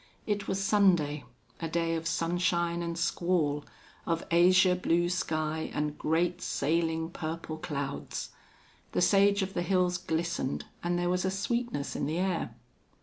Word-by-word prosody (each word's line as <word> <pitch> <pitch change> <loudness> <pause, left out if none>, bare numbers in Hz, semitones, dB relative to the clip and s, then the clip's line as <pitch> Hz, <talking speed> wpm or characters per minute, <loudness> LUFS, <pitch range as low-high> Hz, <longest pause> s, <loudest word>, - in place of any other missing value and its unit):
It 205 -1 -1
was 190 - -1
Sunday, 180 -8 +3 0.3
a 165 - -2
day 165 0 0
of 165 0 -3
sunshine 170 +1 0
and 170 -1 -3
squall, 165 -4 +1 0.4
of 165 0 0
azure 180 +2 +6
blue 175 -1 +1
sky, 160 -3 -1
and 150 0 -1
great, 165 +4 0
sailing, 160 +2 0
purple 160 -1 -5
clouds. 140 -2 -4 0.6
The - - +1
sage 200 +1 +4
of 190 0 -4
the - - -1
hills 180 0 +1
glistened 165 -5 -2 0.2
and 175 0 0
there 175 0 +1
was 180 0 0
a 190 - +1
sweetness 200 - -2
in 140 - -1
the 155 +3 -1
air. 180 -10 -1
170 Hz, 145 wpm, -30 LUFS, 160-185 Hz, 0.6 s, azure